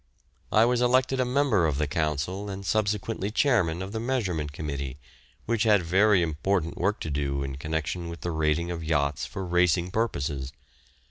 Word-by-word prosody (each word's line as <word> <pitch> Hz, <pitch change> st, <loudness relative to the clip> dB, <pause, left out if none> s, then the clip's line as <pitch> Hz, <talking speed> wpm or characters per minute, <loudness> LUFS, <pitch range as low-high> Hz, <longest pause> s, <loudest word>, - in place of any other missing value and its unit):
I 110 Hz, +2 st, +5 dB
was 120 Hz, 0 st, +2 dB
elected 130 Hz, +2 st, +2 dB
a 130 Hz, -, +2 dB
member 125 Hz, -, +2 dB
of 75 Hz, -3 st, -1 dB
the 75 Hz, -, +1 dB
Council 80 Hz, +6 st, -2 dB
and 100 Hz, 0 st, -6 dB
subsequently 105 Hz, 0 st, 0 dB
chairman 95 Hz, -, +2 dB
of 95 Hz, -, -7 dB
the 110 Hz, -, -3 dB
Measurement 100 Hz, -, -1 dB
Committee, 70 Hz, -3 st, -5 dB, 0.5 s
which 115 Hz, -1 st, 0 dB
had 105 Hz, -5 st, +4 dB
very 95 Hz, +2 st, +4 dB
important 85 Hz, +2 st, -1 dB
work 100 Hz, +4 st, 0 dB
to 80 Hz, -, -3 dB
do 70 Hz, -1 st, -1 dB
in 70 Hz, -1 st, -5 dB
connection 80 Hz, +3 st, -3 dB
with 85 Hz, -1 st, -8 dB
the 85 Hz, -, -2 dB
rating 80 Hz, +2 st, 0 dB
of 85 Hz, -1 st, -4 dB
yachts 75 Hz, -3 st, 0 dB
for 95 Hz, -, -5 dB
racing 90 Hz, 0 st, +2 dB
purposes. 70 Hz, -, -2 dB
90 Hz, 175 wpm, -27 LUFS, 75-105 Hz, 0.5 s, I